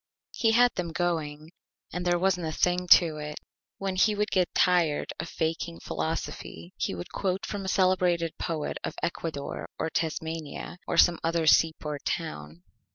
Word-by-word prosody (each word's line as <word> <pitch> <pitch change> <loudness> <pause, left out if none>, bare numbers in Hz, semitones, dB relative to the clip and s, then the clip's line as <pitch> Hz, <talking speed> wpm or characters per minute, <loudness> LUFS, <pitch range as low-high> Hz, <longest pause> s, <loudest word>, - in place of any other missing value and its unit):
He 225 -2 +2
had 245 +1 +5
them 175 -2 -3
Going, 160 -3 -2 0.4
and 180 +2 -2
there 175 0 +3
wasn't 180 -2 +1
a - - -2
Thing 180 +2 +1
to 165 -3 +6
it. 150 0 -5 0.4
When 195 -1 -2
he 210 +3 +4
would 210 +1 -1
get 185 -2 +2
tired 170 -5 +2
of 165 - -4
faking 165 +1 -3
Philosophy 95 - -4
he - - -2
would 85 - -7
quote 190 0 -1
from 200 -2 -4
a - - -4
Celebrated 180 -3 +2
Poet 160 -3 -3
of - - -4
Ecuador 160 -4 -3
or 160 - -2
Tasmania 160 +1 -3
or - - -1
some 175 0 +6
other 165 0 +1
Seaport 155 -2 +3
Town. 75 +3 -4
170 Hz, 160 wpm, -28 LUFS, 155-180 Hz, 0.4 s, to